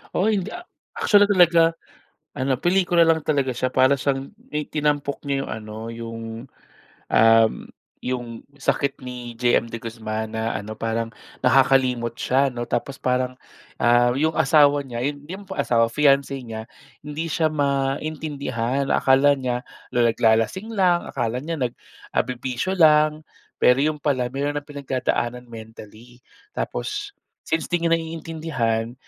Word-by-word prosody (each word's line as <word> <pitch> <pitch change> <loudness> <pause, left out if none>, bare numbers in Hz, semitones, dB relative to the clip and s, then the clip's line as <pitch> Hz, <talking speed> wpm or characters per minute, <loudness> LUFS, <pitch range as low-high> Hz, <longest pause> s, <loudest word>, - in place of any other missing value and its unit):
Oo 215 +4 +2
hindi. 195 -2 -1
A 355 - -8 0.3
actually 205 -1 +5
talaga 170 -4 +5 0.6
ano, 135 -1 0
pelikula 175 +2 +3
lang 160 -1 +3
talaga 140 -3 +1
siya, 130 +1 -1
para 130 +1 +5
siyang 135 0 -2 0.2
may 150 0 -2
tinampok 145 -2 -1
niya 135 0 0
yung - - -7
ano, 110 -1 -7 0.2
yung 115 0 -7 0.9
um, 115 0 +6 0.5
yung 120 -2 -4
sakit 140 0 -1
ni 125 -2 -7
JM 120 -1 +2
De 115 - -5
Guzman 110 -1 -5
na 110 +1 -1
ano 105 +2 -6
parang 115 +1 -2 0.3
nakakalimot 125 -3 +3
siya 135 +2 +2
'no, 120 -1 -5
tapos 135 +2 -3
parang 125 0 -1 0.4
ah, 120 +1 +4
yung 160 +2 +1
asawa 145 0 +4
niya, 125 -2 -4
yun 145 0 -3
yung 195 +2 -7
pong 140 - -2
asawa, 115 -3 +3
fiance 140 -1 +3
niya, 110 -2 -7 0.4
hindi 155 +3 -4
siya 160 +1 0
maintindihan. 140 -2 -1
Akala 140 +1 +4
niya 125 -2 -2 0.3
na 120 - +1
naglalasing 115 - +1
lang, 180 -4 +2
akala 125 +2 -3
niya 165 -4 -4
nag 120 -1 0 0.4
ah, - - +3
bibisyo 130 +8 -3
lang, 155 -3 +4 0.4
pero 125 - +6
yun 150 +2 0
pala 130 -4 0
meron 145 +2 -1
ng 145 - -5
pinagdadaanan 130 -4 -2
mentally. 115 +2 -12 0.3
Tapos, - - -4 0.3
since 160 0 -1
di 175 -1 0
niya 165 0 +3
naiintindihan, 155 -8 -3
135 Hz, 140 wpm, -23 LUFS, 120-150 Hz, 0.9 s, um